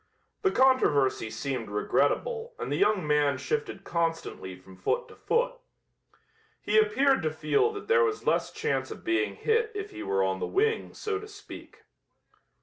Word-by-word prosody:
The 390 - +3
controversy 150 - +3
seemed 115 +1 -4
regrettable 465 - 0
and - - -5
the - - +1
young 200 0 +2
man 145 -2 +2
shifted 445 - -3
constantly 165 - -2
from 95 +1 -15
foot 485 - -1
to - - -13
foot. - - 0 1.0
He 440 - +3
appeared 280 - +3
to 155 - 0
feel 155 - +1
that 410 - -8
there 470 0 +5
was 430 -2 -1
less - - +1
chance 450 +1 -1
of - - -9
being 355 +4 0
hit 450 0 +1
if 410 0 -5
he - - -8
were 95 0 +1
on 95 0 0
the - - -2
wing, 445 +3 0
so 425 -2 -2
to 425 - -9
speak. 415 - -12
270 Hz, 165 wpm, -28 LUFS, -, 1.0 s, there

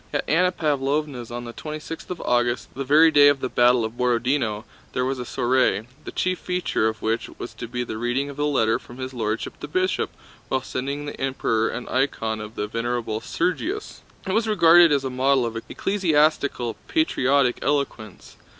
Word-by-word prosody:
At - - -2
Anna 180 +4 +3
Pávlovna's 145 -5 -1
on 120 0 -5
the 120 - -7
twenty 155 +4 -6
sixth 165 +1 -8
of 180 - -5
August, 120 -3 0
the 135 - -4
very 155 +4 +6
day 145 -1 +7
of 145 -1 +4
the 130 - -2
battle 120 -1 +4
of 110 +2 -7
Borodinó, 120 -3 +1 0.3
there 125 - 0
was 130 0 -2
a 125 - -4
soiree, 120 -3 +1 0.2
the - - -6
chief 185 0 -1
feature 180 -11 0
of 110 -1 -4
which 115 +1 -1
was - - -7
to 115 - -7
be 125 +1 -3
the 110 -2 -6
reading 120 +4 0
of 140 0 -9
a 145 - +1
letter 115 -6 +2
from 120 - -13
His 130 0 -5
Lordship 110 -2 -3
the - - -6
Bishop 185 +5 0 0.4
when 130 -1 0
sending 140 +3 -4
the 145 - -7
Emperor 115 -4 0
an 125 - -5
icon 115 -5 -1
of 105 +2 -9
the 105 - -2
Venerable 115 0 -2
Sergius. 305 - -2 0.2
It 190 - -2
was 225 +2 +1
regarded 175 -5 +6
as 140 -2 +2
a 130 - -3
model 130 0 +2
of 115 -1 -4
ecclesiastical, 150 - 0
patriotic 140 - +2
eloquence. 140 -8 -3
130 Hz, 190 wpm, -24 LUFS, 120-150 Hz, 0.4 s, day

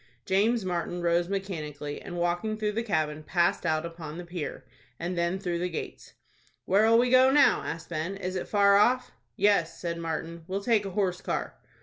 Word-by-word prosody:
James 210 +3 +2
Martin 175 -1 -2
rose 170 +1 +2
mechanically, 155 -7 -4
and, 175 - -7
walking 175 +6 -1
through 215 -1 -1
the 225 +2 -1
cabin, 155 -8 -1
passed 170 +1 +1
out 155 0 +1
upon 165 -2 -7
the 175 - -7
pier, 170 -3 -6 0.3
and 175 +2 -3
then 170 +2 0
through 175 -3 -2
the 180 +1 -1
gates. 165 - -7 0.5
"Where'll 220 +4 +4
we 245 +1 +3
go 260 +1 +7
now?" 285 +2 +5
asked 165 0 -6
Ben. 170 +4 -3
"Is 185 -1 -4
it 185 - -3
far 200 -1 +5
off?" 250 +4 +3 0.2
"Yes," 200 - +2
said 170 -1 -3
Martin. 165 0 -4
"We'll 195 +1 -3
take 220 -3 +2
a 195 +1 -8
horse 185 -3 0
car." - - -3
180 Hz, 190 wpm, -28 LUFS, 170-205 Hz, 0.5 s, go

